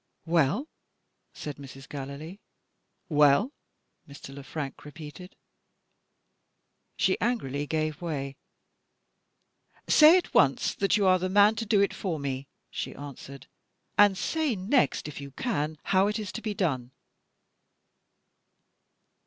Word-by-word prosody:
"Well?" 165 - +2 0.6
said 150 -2 -7
Mrs. 135 0 -11
Gallilee. 145 +6 -7 0.7
"Well?" 150 - +4 0.6
Mr. 140 -1 -10
Le 140 - -8
Frank 150 -1 -6
repeated. 155 +4 -10 1.6
She - - +1
angrily 145 - -1
gave 155 0 -2
way. 140 -5 -4 1.5
"Say 315 +4 +8
at 365 - -3
once 140 -3 +3
that 195 +2 +1
you 205 - +2
are 185 -1 +5
the 185 +1 -2
man 205 +2 +6
to 225 0 -3
do 205 -2 +4
it 200 - +2
for 180 -5 -3
me!" 135 -1 -4 0.2
she - - -5
answered. 140 -1 -10 0.5
"And 205 -2 +5
say 315 - 0
next 205 - +1
if 145 -1 -7
you 140 - -7
can 155 - -2
how 190 +1 +3
it 210 - -1
is 210 -3 -5
to 230 - -6
be 215 -2 -3
done." 135 -11 -1
160 Hz, 125 wpm, -28 LUFS, 140-205 Hz, 1.6 s, Say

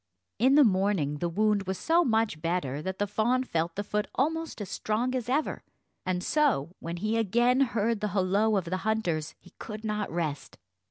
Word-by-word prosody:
In 260 +4 +5
the 295 - +8
morning 190 - +1
the 175 - -1
wound 205 +1 +1
was 190 0 -2
so 335 - +3
much 220 - +1
better 165 -5 -1
that 190 +3 -4
the 205 - +1
fawn 235 +5 +1
felt 165 -7 -2
the 205 - -2
foot 210 +1 -2
almost 320 +3 -1
as 205 - -5
strong 235 +4 -1
as 250 -2 -3
ever, 295 +4 0 0.5
and 180 -1 -1
so, 265 - +1
when 170 +1 -5
he 215 +5 0
again 240 +4 +3
heard 230 -3 +1
the 210 - -1
holloa 200 +2 +2
of 190 - -1
the 185 +2 -2
hunters, 180 -7 -1
he - - -18
could 215 0 -7
not 210 -1 -2
rest. 155 -4 -4
210 Hz, 195 wpm, -28 LUFS, 180-235 Hz, 0.5 s, the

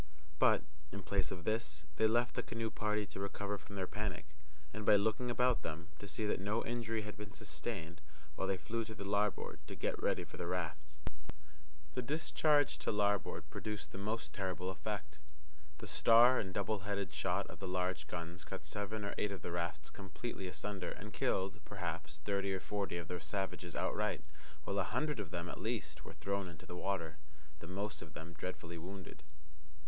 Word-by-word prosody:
But, - - +7 0.3
in 100 -1 -5
place 95 -3 +2
of 90 -2 -4
this, 80 -9 0
they 110 - +7
left 120 +2 +3
the - - +2
canoe 115 -1 -2
party 105 -1 +1
to 95 - -7
recover 100 +1 -1
from 100 - -9
their 95 -1 +1
panic, 100 -5 -2 0.5
and, 110 - -3
by 105 - +8
looking 110 +4 +3
about 125 0 +4
them, 85 +3 -4
to 100 - -6
see 110 +2 -1
that 105 - +2
no 105 +4 +1
injury 115 -2 0
had 105 0 -5
been 105 -2 -7
sustained, 85 0 -3 0.3
while 95 - 0
they 95 -1 +2
flew 115 +5 -1
to 110 - -6
the 100 - -5
larboard 105 0 +2
to - - -5
get - - 0
ready - - +3
for - - -9
the 85 - -2
rafts. 80 -4 -2 1.0
The - - 0
discharge 150 +1 +4
to - - +1
larboard 105 -1 +2
produced 105 -2 -3
the 95 - -5
most 110 +3 -1
terrible 95 -1 -1
effect. 90 -6 -4 0.6
The - - -6
star 120 +2 +8
and 95 - -1
double 100 +2 +1
headed 100 0 -1
shot - - +2
of - - -9
the 95 - -3
large 90 -3 0
guns 85 0 -4
cut - - -5
seven 105 +1 -2
or 100 - -1
eight 105 - +2
of 100 - -5
the 90 - -2
rafts 85 -3 -1
completely 100 0 -4
asunder, 90 +2 -2
and 105 +5 -6
killed, 95 +3 +2
perhaps, 85 -5 -3
thirty 100 -1 +2
or - - -1
forty 100 -2 -1
of 85 -2 -4
the 90 0 -2
savages 95 -2 -2
outright, 75 - +1 0.4
while 100 - +1
a - - +5
hundred 150 +7 +1
of 100 -5 -2
them, 85 +2 -2
at - - -5
least, - - -1
were - - -8
thrown 100 -1 -1
into 80 -2 -10
the 90 - -6
water, 90 -4 -1 0.4
the 85 - -8
most 100 +3 -2
of 80 -2 -9
them 80 +2 -6
dreadfully 85 -1 -4
wounded. 90 -2 -7
100 Hz, 195 wpm, -38 LUFS, 90-105 Hz, 1.0 s, by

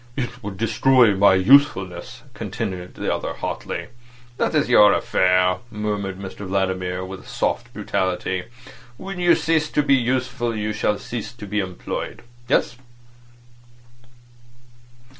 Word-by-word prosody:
"It 125 -2 -4
would 100 -4 -6
destroy 115 0 +4
my 95 0 +5
usefulness," 115 -1 +3
continued 100 -5 -5
the - - -1
other - - -3
hotly. - - -5 0.5
"That's 150 +3 +1
your 105 -4 +7
affair," 90 0 +2
murmured 105 -3 -3
Mr 95 +1 -8
Vladimir, 95 -1 -1
with 95 0 -9
soft - - -2
brutality. 95 0 -2 0.5
"When 195 +2 -7
you 175 -1 +5
cease 160 -1 +1
to 150 - +1
be 140 -1 +3
useful 125 -2 0
you 105 0 -2
shall 105 0 0
cease 115 0 -6
to 115 -4 -10
be 105 +1 -2
employed. 95 +3 -5 0.2
Yes. 120 - +1
105 Hz, 120 wpm, -22 LUFS, 95-125 Hz, 0.5 s, your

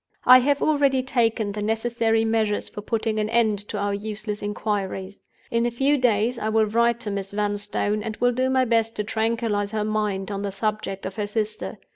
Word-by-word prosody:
"I 255 +1 +9
have 285 +2 +1
already 280 -4 +2
taken 230 -5 +1
the 210 +1 -5
necessary 225 +1 +1
measures 220 -2 0
for 210 - -8
putting 220 0 -1
an 215 0 -1
end 220 -3 +2
to 210 - -3
our 205 0 -1
useless 210 0 -4
inquiries. 200 -2 -3 0.3
In 235 +1 +2
a - - +1
few 270 +5 +2
days 240 -2 +1
I 215 - -1
will 220 0 +3
write 235 +2 +2
to 215 -4 -3
Miss 200 0 -4
Vanstone, 205 0 -1
and 215 0 -5
will 245 0 +3
do 255 +2 0
my 260 0 +3
best 225 -1 +1
to 210 - -1
tranquilize 220 -2 -1
her 215 -1 0
mind 210 -2 -1
on 200 0 -3
the 200 -1 -3
subject 210 -1 -3
of 190 +2 -6
her 205 -1 -1
sister. 215 0 -3
220 Hz, 200 wpm, -24 LUFS, 205-235 Hz, 0.3 s, I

